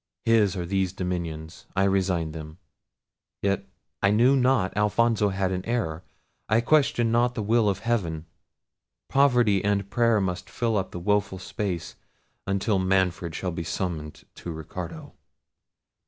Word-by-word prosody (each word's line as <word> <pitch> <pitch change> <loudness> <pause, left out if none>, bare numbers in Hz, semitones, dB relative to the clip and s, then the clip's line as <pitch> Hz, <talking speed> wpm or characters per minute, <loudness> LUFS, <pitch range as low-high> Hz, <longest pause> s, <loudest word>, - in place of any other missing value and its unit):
His 110 -4 +4
are 90 -2 -3
these 95 0 0
dominions; 85 -3 -5
I 95 - +3
resign 95 -4 +1
them—yet 80 +4 -7 0.3
I 100 - +4
knew 120 +6 +5
not 125 -8 +2
Alfonso 105 +1 +2
had 95 -1 -1
an 90 0 -2
heir—I 110 0 -3
question 120 -4 +3
not 120 +1 +2
the 110 - -2
will 110 0 +3
of 100 - 0
heaven—poverty 105 - -1
and 100 -1 0
prayer 115 -2 +3
must 95 0 -3
fill 115 -2 -1
up 95 - 0
the - - -7
woeful 100 +1 0
space, 95 -2 -4 0.5
until 100 +1 +1
Manfred 95 -3 +1
shall 90 - -2
be 85 0 -4
summoned 80 -3 -4
to 85 - -6
Ricardo." 80 +2 -7
95 Hz, 130 wpm, -26 LUFS, 90-110 Hz, 0.5 s, knew